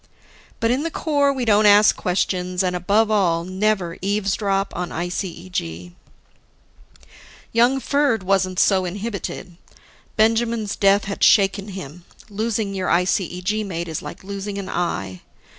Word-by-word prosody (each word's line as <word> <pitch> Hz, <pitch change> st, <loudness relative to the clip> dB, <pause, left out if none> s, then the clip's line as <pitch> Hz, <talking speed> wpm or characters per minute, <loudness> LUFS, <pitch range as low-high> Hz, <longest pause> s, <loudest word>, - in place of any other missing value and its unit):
But 230 Hz, +1 st, +1 dB
in 255 Hz, +3 st, +1 dB
the 330 Hz, -, -2 dB
Corps, 285 Hz, -3 st, +1 dB
we 260 Hz, -3 st, -2 dB
don't 210 Hz, -1 st, +4 dB
ask 205 Hz, +1 st, +6 dB
questions 180 Hz, 0 st, -1 dB
and, 180 Hz, -1 st, -1 dB
above 205 Hz, +5 st, +2 dB
all, 175 Hz, -5 st, +2 dB
never 185 Hz, -2 st, -1 dB
eavesdrop 195 Hz, 0 st, -1 dB
on 180 Hz, 0 st, -3 dB
ICEG. 170 Hz, -, -5 dB, 1.6 s
Young 240 Hz, +4 st, +3 dB
Ferd 280 Hz, -6 st, +1 dB
wasn't 185 Hz, -1 st, +1 dB
so 190 Hz, -2 st, +3 dB
inhibited. 190 Hz, -2 st, -5 dB, 0.6 s
Benjamin's 225 Hz, -1 st, +1 dB
death 200 Hz, 0 st, +3 dB
had 200 Hz, 0 st, -4 dB
shaken 200 Hz, 0 st, +4 dB
him 180 Hz, -4 st, -9 dB, 0.3 s
losing 215 Hz, -1 st, -2 dB
your 190 Hz, -1 st, -2 dB
ICEG 180 Hz, +3 st, 0 dB
mate 170 Hz, -4 st, -4 dB
is 160 Hz, -2 st, -4 dB
like -, -, -9 dB
losing 200 Hz, +1 st, -5 dB
an 195 Hz, -1 st, -5 dB
eye. 95 Hz, -, -3 dB
195 Hz, 130 wpm, -21 LUFS, 180-215 Hz, 1.6 s, ask